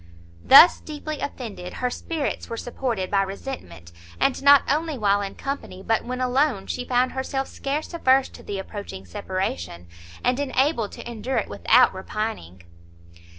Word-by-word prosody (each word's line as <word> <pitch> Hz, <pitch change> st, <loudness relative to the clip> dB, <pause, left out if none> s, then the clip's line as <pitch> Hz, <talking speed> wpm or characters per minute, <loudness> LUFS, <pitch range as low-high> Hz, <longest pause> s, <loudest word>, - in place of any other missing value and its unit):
Thus, 325 Hz, +6 st, +9 dB
deeply 305 Hz, 0 st, -6 dB
offended, 210 Hz, -10 st, -6 dB
her 250 Hz, 0 st, -2 dB
spirits 315 Hz, 0 st, -4 dB
were 230 Hz, -, -4 dB
supported 235 Hz, -6 st, -3 dB
by 200 Hz, -1 st, +3 dB
resentment, 190 Hz, -, -7 dB, 0.3 s
and 275 Hz, -, +1 dB
not 280 Hz, 0 st, +7 dB
only 310 Hz, 0 st, 0 dB
while 205 Hz, -2 st, +2 dB
in 195 Hz, -1 st, -5 dB
company, 275 Hz, -9 st, -6 dB
but 225 Hz, +2 st, +1 dB
when 250 Hz, +1 st, -4 dB
alone, 255 Hz, -4 st, +1 dB
she 250 Hz, -, -4 dB
found 250 Hz, 0 st, +2 dB
herself 265 Hz, +1 st, -3 dB
scarce 290 Hz, +5 st, -4 dB
averse 265 Hz, -5 st, +3 dB
to -, -, -13 dB
the 200 Hz, -, -5 dB
approaching 195 Hz, -, -7 dB
separation, 90 Hz, -, -4 dB, 0.4 s
and 250 Hz, +2 st, +1 dB
enabled 265 Hz, -4 st, 0 dB
to -, -, -9 dB
endure 240 Hz, +3 st, -3 dB
it -, -, -1 dB
without 250 Hz, +2 st, +4 dB
repining. 190 Hz, -, -5 dB
245 Hz, 150 wpm, -24 LUFS, 195-275 Hz, 0.4 s, Thus